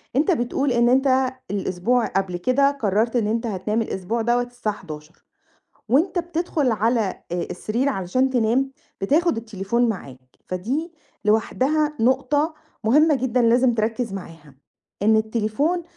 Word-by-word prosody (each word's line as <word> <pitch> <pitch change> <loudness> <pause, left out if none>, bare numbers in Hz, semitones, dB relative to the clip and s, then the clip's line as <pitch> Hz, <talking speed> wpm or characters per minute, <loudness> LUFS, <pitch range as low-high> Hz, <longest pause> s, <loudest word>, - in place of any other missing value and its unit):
أنت 305 +8 +3
بتقول 270 -1 0
إن 240 0 +3
أنت 260 0 +3 0.2
الأسبوع 205 +5 0
قبل 190 -2 -1
كده 265 +8 +3
قررت 225 -3 0
إن 225 -4 +2
أنت 230 +2 -1
هتنام 210 +3 -1
الأسبوع 220 +2 -2
دوّة 240 +2 +2
الساعة 245 -4 -4
23:00 155 -4 -11 0.7
وأنت 335 - +2
بتدخل 335 -5 -1
على، 225 +3 +1 0.3
آآ، 175 0 -1
السرير 235 +9 -1
علشان 255 +3 0
تنام 250 +2 +1 0.3
بتاخد 305 - +2
التليفون 225 +2 -1
معاك، 130 - -7
فدي 260 - -3 0.3
لوحدها 280 +8 +1
نقطة 275 +6 +2 0.3
مُهمة 300 +7 +5
جدًا 255 -2 +1
لازم 240 +1 +4
تركّز 225 0 -1
معاها، 165 -7 -9 0.5
إن 220 +1 +5
التليفون 220 +10 0
235 Hz, 130 wpm, -23 LUFS, 210-270 Hz, 0.7 s, مُهمة